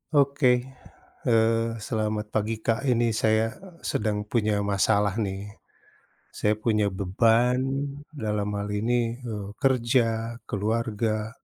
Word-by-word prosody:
Oke, 140 Hz, -3 st, +4 dB, 0.6 s
eee, 115 Hz, -1 st, +3 dB, 0.2 s
selamat 110 Hz, -3 st, -2 dB
pagi 110 Hz, +1 st, 0 dB
Kak 115 Hz, +4 st, 0 dB
ini 120 Hz, -2 st, +3 dB
saya, 110 Hz, +1 st, +2 dB
eee, 180 Hz, -3 st, -15 dB
sedang 105 Hz, -1 st, -1 dB
punya 105 Hz, -1 st, 0 dB
masalah 100 Hz, +1 st, +2 dB
nih. 100 Hz, -1 st, -3 dB, 0.8 s
Saya 105 Hz, -, +1 dB
punya 110 Hz, -1 st, +1 dB
beban 115 Hz, +6 st, +3 dB, 0.5 s
dalam 105 Hz, -8 st, -2 dB
hal 100 Hz, -, -2 dB
ini, 115 Hz, +3 st, 0 dB
eee, 105 Hz, -5 st, -5 dB
kerja, 120 Hz, -3 st, +1 dB
keluarga, 110 Hz, 0 st, -1 dB
110 Hz, 110 wpm, -26 LUFS, 105-120 Hz, 0.8 s, Oke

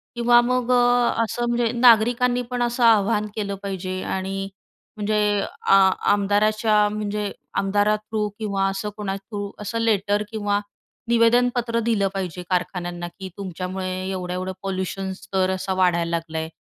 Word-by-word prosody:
किंवा 240 Hz, 0 st, +5 dB
मग 250 Hz, 0 st, 0 dB
अ, 245 Hz, -1 st, +4 dB
असं 240 Hz, +2 st, -2 dB
म्हणजे 240 Hz, -1 st, +1 dB
नागरिकांनी 245 Hz, +1 st, +4 dB
पण 245 Hz, -1 st, -2 dB
असं 240 Hz, +1 st, -1 dB
आव्हान 210 Hz, -1 st, +4 dB
केलं 200 Hz, -2 st, -3 dB
पाहिजे 185 Hz, -1 st, -4 dB
आणि 195 Hz, +1 st, -3 dB, 0.5 s
म्हणजे 210 Hz, 0 st, 0 dB, 0.5 s
आ -, -, +8 dB, 0.4 s
आमदाराच्या 210 Hz, +1 st, +2 dB
म्हणजे 210 Hz, -1 st, -3 dB, 0.3 s
आमदारा 205 Hz, +2 st, +2 dB
थ्रू 215 Hz, 0 st, -3 dB
किंवा 200 Hz, -3 st, -1 dB
असं 195 Hz, +2 st, -3 dB
कोणा 200 Hz, -2 st, -3 dB
थ्रू 200 Hz, 0 st, -6 dB
असं 215 Hz, +2 st, -3 dB
लेटर 210 Hz, -2 st, +1 dB
किंवा 205 Hz, -2 st, 0 dB, 0.5 s
निवेदनपत्र 235 Hz, 0 st, +3 dB
दिलं 215 Hz, -4 st, +2 dB
पाहिजे 180 Hz, -2 st, -4 dB
कारखान्यांना 175 Hz, -1 st, -2 dB
की 190 Hz, -1 st, -6 dB
तुमच्यामुळे 185 Hz, 0 st, -5 dB, 0.2 s
एवढं-एवढं 185 Hz, 0 st, -3 dB
पॉल्यूशन 190 Hz, 0 st, -3 dB
स्तर 190 Hz, 0 st, -1 dB
असा 190 Hz, 0 st, -2 dB
वाढायला 175 Hz, -2 st, +2 dB
लागलाय. 165 Hz, -1 st, -3 dB
205 Hz, 135 wpm, -23 LUFS, 190-230 Hz, 0.5 s, आ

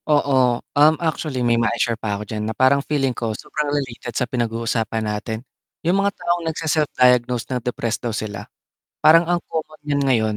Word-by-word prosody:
Oo, 130 Hz, -5 st, +3 dB, 0.2 s
um, 150 Hz, +2 st, +5 dB
actually 155 Hz, -6 st, -2 dB
may 120 Hz, 0 st, +3 dB
mai-share 115 Hz, 0 st, +1 dB
pa 110 Hz, -3 st, -3 dB
ako 105 Hz, -, -6 dB
diyan 105 Hz, 0 st, -4 dB
na -, -, -2 dB
parang 130 Hz, +2 st, +4 dB
feeling 140 Hz, -3 st, 0 dB
ko 115 Hz, -3 st, -3 dB
sobrang 150 Hz, -1 st, -3 dB
related 125 Hz, -5 st, -3 dB
sa 125 Hz, -, +1 dB
pinag-uusapan 115 Hz, -2 st, -2 dB
natin. 110 Hz, +3 st, -4 dB, 0.4 s
Yung 185 Hz, +4 st, +3 dB
mga 200 Hz, 0 st, 0 dB
taong 175 Hz, 0 st, 0 dB
nagse-self-diagnose 125 Hz, -7 st, +2 dB
na 125 Hz, -, -1 dB
depressed 120 Hz, -1 st, -2 dB
daw 120 Hz, -, -2 dB
sila. 105 Hz, -2 st, -5 dB, 0.5 s
Parang 165 Hz, +2 st, +7 dB
ang 175 Hz, -, +3 dB
common 155 Hz, -1 st, -5 dB
niyan 145 Hz, -1 st, +1 dB
ngayon, 110 Hz, -6 st, +2 dB
125 Hz, 175 wpm, -21 LUFS, 115-150 Hz, 0.5 s, Parang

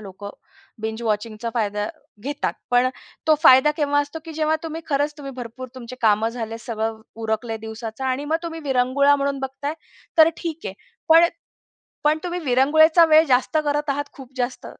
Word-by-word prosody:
लोकं 200 Hz, 0 st, -9 dB, 0.5 s
बिंज 220 Hz, +1 st, -4 dB
वॉचिंगचा 220 Hz, +1 st, -2 dB
फायदा 210 Hz, -2 st, -1 dB, 0.4 s
घेतात. 285 Hz, +3 st, -2 dB, 0.2 s
पण 245 Hz, +1 st, +4 dB, 0.4 s
तो 310 Hz, -, +6 dB
फायदा 265 Hz, +3 st, +7 dB
केव्हा 290 Hz, -1 st, +2 dB
असतो, 290 Hz, +3 st, -5 dB
की 325 Hz, -, -8 dB
जेव्हा 310 Hz, 0 st, +1 dB
तुम्ही 325 Hz, 0 st, -5 dB
खरंच 290 Hz, +1 st, 0 dB
तुम्ही 275 Hz, -2 st, -7 dB
भरपूर 250 Hz, +1 st, -7 dB
तुमची 255 Hz, -1 st, -9 dB
कामं 220 Hz, 0 st, +3 dB
झाले, 225 Hz, -1 st, -5 dB
सगळं 220 Hz, -1 st, -4 dB, 0.2 s
उरकलय 220 Hz, +1 st, -2 dB
दिवसाचं 220 Hz, +3 st, -7 dB
आणि 260 Hz, +2 st, -1 dB
मग 310 Hz, +2 st, +1 dB
तुम्ही 330 Hz, -1 st, -5 dB
विरंगुळा 270 Hz, +2 st, +3 dB
म्हणून 280 Hz, 0 st, -1 dB
बघताय, 275 Hz, +3 st, -4 dB, 0.4 s
तर 320 Hz, 0 st, +9 dB
ठीक 330 Hz, -1 st, -5 dB
आहे. 190 Hz, -, -5 dB, 0.3 s
पण, 325 Hz, +1 st, +8 dB, 0.8 s
पण 305 Hz, +1 st, +3 dB
तुम्ही 355 Hz, 0 st, -3 dB
विरंगुळेचा 315 Hz, +5 st, +5 dB
वेळ 315 Hz, 0 st, +6 dB
जास्त 260 Hz, +5 st, +2 dB
करत 295 Hz, 0 st, 0 dB
आहात, 290 Hz, +1 st, -1 dB
खूप 265 Hz, -2 st, -13 dB
जास्त 250 Hz, 0 st, -3 dB
265 Hz, 165 wpm, -22 LUFS, 230-300 Hz, 0.8 s, तर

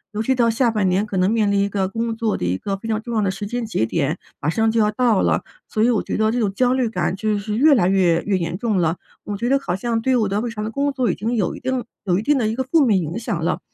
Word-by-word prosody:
尤 215 Hz, -, -1 dB
其 265 Hz, -, +2 dB
到 235 Hz, -2 st, +2 dB
下 235 Hz, 0 st, +2 dB
半 210 Hz, -4 st, +1 dB
年 190 Hz, +4 st, +1 dB
可 200 Hz, -3 st, -4 dB
能 185 Hz, +2 st, +3 dB
面 215 Hz, -2 st, +2 dB
临 200 Hz, -, +2 dB
一 200 Hz, -, +2 dB
个 195 Hz, -2 st, -1 dB
工 230 Hz, +1 st, -2 dB
作 225 Hz, -2 st, -1 dB
的 90 Hz, -, -3 dB
一 90 Hz, +1 st, 0 dB
个 195 Hz, -, -3 dB
非 225 Hz, -, -8 dB
常 220 Hz, 0 st, -1 dB
重 235 Hz, 0 st, -5 dB
要 -, -, +2 dB
的 195 Hz, -, +1 dB
时 195 Hz, +2 st, -4 dB
间 240 Hz, +2 st, -3 dB
节 110 Hz, -, 0 dB
点， 155 Hz, +5 st, -1 dB, 0.2 s
马 150 Hz, -, -1 dB
上 225 Hz, +6 st, +1 dB
就 230 Hz, -, +1 dB
要 210 Hz, -1 st, +3 dB
到 235 Hz, -3 st, +2 dB
了， -, -, +1 dB, 0.2 s
所 215 Hz, -1 st, 0 dB
以 240 Hz, -, +4 dB
我 225 Hz, -, +2 dB
觉 -, -, -4 dB
得 220 Hz, 0 st, +2 dB
这 245 Hz, -, -1 dB
种 200 Hz, -4 st, 0 dB
焦 250 Hz, +3 st, +2 dB
虑 255 Hz, -2 st, +1 dB
感 185 Hz, -4 st, -1 dB
就 215 Hz, 0 st, 0 dB
是 210 Hz, +1 st, -3 dB
越 290 Hz, +2 st, +6 dB
来 185 Hz, -5 st, +3 dB
越 175 Hz, -3 st, +3 dB
越 200 Hz, -2 st, +1 dB
严 170 Hz, 0 st, -3 dB
重 220 Hz, -3 st, 0 dB
了。 165 Hz, -1 st, +1 dB, 0.3 s
我 205 Hz, -, -3 dB
觉 235 Hz, +5 st, -2 dB
得 275 Hz, 0 st, +3 dB
好 180 Hz, -9 st, -2 dB
像 230 Hz, +3 st, -1 dB
对 260 Hz, +2 st, +1 dB
我 215 Hz, -5 st, +1 dB
的 200 Hz, +2 st, 0 dB
日 235 Hz, +1 st, -2 dB
常 210 Hz, -2 st, -5 dB
的 220 Hz, -, -4 dB
工 280 Hz, +3 st, -1 dB
作 255 Hz, -3 st, +1 dB
已 -, -, -3 dB
经 230 Hz, +3 st, -2 dB
有 200 Hz, -5 st, 0 dB
一 -, -, -8 dB
定 255 Hz, -1 st, -2 dB, 0.2 s
有 180 Hz, -1 st, +2 dB
一 -, -, -1 dB
定 290 Hz, +4 st, +2 dB
的 225 Hz, -4 st, +1 dB
一 220 Hz, -, -1 dB
个 260 Hz, -, -1 dB
负 285 Hz, +2 st, +3 dB
面 210 Hz, -5 st, +3 dB
影 165 Hz, +7 st, -4 dB
响 170 Hz, -8 st, -3 dB
了。 175 Hz, -, 0 dB
215 Hz, 350 characters per minute, -21 LUFS, 195-235 Hz, 0.3 s, 越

